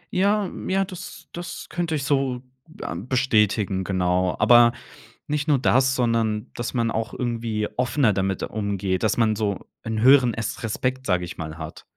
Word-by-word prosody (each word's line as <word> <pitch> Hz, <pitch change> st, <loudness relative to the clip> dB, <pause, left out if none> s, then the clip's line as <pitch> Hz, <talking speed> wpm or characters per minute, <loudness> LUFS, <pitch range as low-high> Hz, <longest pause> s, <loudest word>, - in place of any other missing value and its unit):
Ja 200 Hz, +2 st, +3 dB
m -, -, -7 dB
ja, 195 Hz, +1 st, +2 dB
das 185 Hz, -2 st, -10 dB
das 175 Hz, 0 st, -7 dB
könnte 170 Hz, -2 st, -2 dB
ich 140 Hz, -, -2 dB
so, 135 Hz, -3 st, 0 dB, 0.4 s
ähm, 110 Hz, -, -5 dB
bestätigen, 105 Hz, -6 st, +2 dB
genau. 90 Hz, -1 st, 0 dB
Aber 120 Hz, -1 st, +6 dB, 0.5 s
nicht 150 Hz, +1 st, -2 dB
nur 145 Hz, -3 st, +4 dB
das, 130 Hz, +1 st, +3 dB
sondern 115 Hz, -3 st, 0 dB
dass 120 Hz, 0 st, -4 dB
man 115 Hz, -2 st, 0 dB
auch 110 Hz, +1 st, -3 dB
irgendwie 115 Hz, -3 st, -2 dB
offener 125 Hz, -3 st, +2 dB
damit 95 Hz, 0 st, -1 dB
umgeht, 100 Hz, -3 st, -2 dB
dass 110 Hz, +1 st, +1 dB
man 110 Hz, -2 st, +3 dB
so 100 Hz, -3 st, -2 dB, 0.2 s
'n 110 Hz, -1 st, -2 dB
höheren 130 Hz, -1 st, +6 dB
Es 115 Hz, +1 st, -4 dB
Respekt, 130 Hz, +4 st, -2 dB
sage 90 Hz, -2 st, +1 dB
ich -, -, -8 dB
mal, 80 Hz, 0 st, -6 dB
hat. 80 Hz, -1 st, -8 dB
115 Hz, 170 wpm, -24 LUFS, 100-130 Hz, 0.5 s, Aber